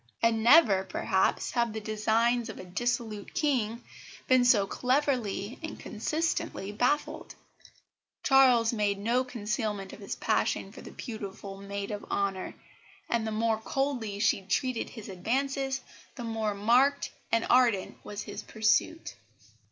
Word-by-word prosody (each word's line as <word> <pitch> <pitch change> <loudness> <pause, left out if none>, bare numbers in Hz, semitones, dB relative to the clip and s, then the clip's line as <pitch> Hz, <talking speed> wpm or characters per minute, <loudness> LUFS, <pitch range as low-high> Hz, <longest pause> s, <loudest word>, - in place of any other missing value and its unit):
And 230 -1 +3
never, 230 - +6
perhaps, 190 0 0
have 235 -3 0
the 220 - -3
designs 220 +3 +1
of 220 - -7
a - - -8
dissolute 220 +2 -3
King 245 -6 0 0.4
been 255 -1 +5
so 215 -5 +5
cleverly 250 -3 -1
and 320 -1 -6
consistently 300 -5 -2
baffled. 250 +8 -1 0.9
Charles 250 -4 +5
made 205 -3 0
no 235 +5 +1
concealment 210 -4 -3
of - - -10
his 200 - -5
passion - - 0
for - - -11
the - - -10
beautiful 200 -4 -7
maid 200 +1 -5
of 205 -1 -5
honour, 195 -2 -2 0.6
and 230 -2 +1
the - - -2
more 220 0 +1
coldly 245 -4 -2
she 205 -1 +2
treated 230 +6 -1
his 220 -4 -10
advances, 265 +7 -1 0.3
the 245 - -6
more 220 -2 -2
marked 250 +7 +3 0.2
and 230 0 +2
ardent 240 -6 +3
was 205 0 -6
his 205 - -7
pursuit. 220 +9 0
225 Hz, 135 wpm, -29 LUFS, 205-250 Hz, 0.9 s, never